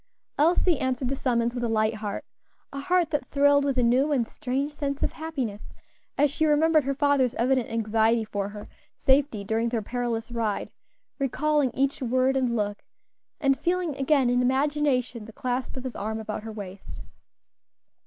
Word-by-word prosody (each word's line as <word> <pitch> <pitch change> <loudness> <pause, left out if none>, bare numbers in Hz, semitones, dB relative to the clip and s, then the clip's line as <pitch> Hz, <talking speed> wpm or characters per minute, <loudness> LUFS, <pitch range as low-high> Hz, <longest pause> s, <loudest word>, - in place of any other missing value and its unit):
Elsie 335 +1 +3
answered 255 -1 -1
the 275 - -1
summons 240 -3 0
with 245 -1 -3
a 235 - 0
light 215 0 +2
heart 210 -2 -5 0.5
a 275 - -4
heart 345 +2 +1
that 295 -2 -1
thrilled 285 0 +4
with 275 -2 0
a 250 - +3
new 255 +5 +3
and 255 -5 +2
strange 275 +3 -3
sense 280 -1 -3
of - - +1
happiness 265 -10 -5 0.5
as 290 0 +3
she 315 - -1
remembered 310 -1 +4
her 275 0 -1
father's 275 -3 +2
evident 255 0 +1
anxiety 225 0 +2
for 200 -1 -3
her 210 0 -9 0.3
safety 265 -6 +2
during 225 +3 0
their 230 -2 -2
perilous 240 0 -3
ride, 225 -3 -2 0.5
recalling 290 +1 +1
each 275 +1 0
word 255 +2 +2
and 250 -3 +1
look, 205 -2 -2 0.6
and 275 -3 +2
feeling 350 -4 0
again, 275 -1 +2
in 245 +1 +2
imagination, 265 -3 0
the 225 - -11
clasp 250 +2 -3
of 255 - -6
his 260 -2 -5
arm 220 +2 -3
about 215 -1 -5
her 220 +1 -7
waist. 200 -2 -9
255 Hz, 175 wpm, -26 LUFS, 225-285 Hz, 0.6 s, thrilled